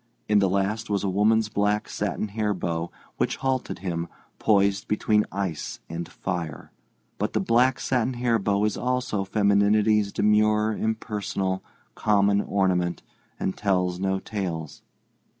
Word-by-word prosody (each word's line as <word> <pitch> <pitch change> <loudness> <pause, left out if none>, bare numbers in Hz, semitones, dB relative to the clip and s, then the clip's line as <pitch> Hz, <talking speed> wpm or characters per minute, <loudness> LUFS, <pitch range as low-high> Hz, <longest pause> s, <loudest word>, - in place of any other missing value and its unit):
In 105 -1 +4
the 100 -2 +3
last 100 +4 -1
was 100 -1 0
a 100 - 0
woman's 105 +3 +3
black 105 0 0
satin 105 - -2
hair 105 0 -1
bow, 85 -1 -2 0.3
which - - 0
halted 130 -1 -2
him, 85 -1 -2 0.3
poised 100 -1 +2
between 105 0 +2
ice 95 -6 -3
and 85 +1 -5
fire. 85 -5 -5 0.5
But - - -1
the - - +2
black 125 +3 +3
satin 125 0 0
hair 120 -2 +1
bow 100 +1 +1
also 125 -4 -1
is 95 - -5
femininity's 105 +1 +3
demure, 105 +1 +3
impersonal, 105 -4 -2 0.3
common 100 -1 +3
ornament, 90 -4 0 0.4
and 95 - -1
tells 90 -3 0
no 95 0 0
tales. 90 -7 -5
100 Hz, 135 wpm, -25 LUFS, 95-110 Hz, 0.5 s, In